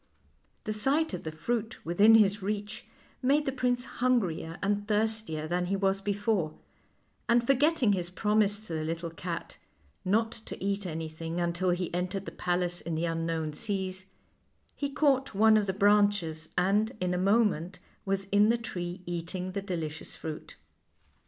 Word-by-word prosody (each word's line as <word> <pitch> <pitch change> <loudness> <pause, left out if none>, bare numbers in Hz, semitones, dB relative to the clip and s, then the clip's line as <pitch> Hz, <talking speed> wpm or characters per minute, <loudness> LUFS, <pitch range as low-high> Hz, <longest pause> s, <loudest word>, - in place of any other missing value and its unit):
The 215 - -2
sight 270 +7 +2
of 180 - -5
the 160 - -3
fruit 225 +7 -3
within 200 +7 +6
his 205 -2 +4
reach 210 +2 -4 0.3
made 285 +3 +3
the 270 - 0
prince 250 -1 0
hungrier 195 -10 0
and 205 +1 0
thirstier 215 -7 0
than 175 +2 -1
he 195 - 0
was 195 0 +1
before, 205 -5 -1 0.7
and 235 0 +4
forgetting 275 -3 +3
his 175 -2 -2
promise 210 +2 +2
to 215 -6 -7
the 155 -1 -2
little 165 +1 -3
cat 165 +1 -6 0.4
not 220 +4 +2
to 225 - -8
eat 200 0 -1
anything 165 +1 -4
until 175 +1 0
he 180 -1 -1
entered 180 +2 -2
the - - -6
palace 175 0 -1
in 165 0 -3
the 165 +2 0
unknown 165 -2 -2
seas 190 +1 -3 0.7
he 285 - -2
caught 275 -4 +1
one 220 +2 +6
of 210 -2 +2
the - - +2
branches, 200 -5 +2
and, 205 +6 +2
in 180 0 0
a - - 0
moment, 195 -3 +2 0.3
was 195 0 -1
in 205 +2 +5
the 235 - +3
tree 180 -6 -5
eat 170 0 -4
ing 185 0 -3
the 200 +1 -3
delicious 165 -6 -5
fruit. 155 -1 -7
195 Hz, 165 wpm, -29 LUFS, 175-220 Hz, 0.7 s, within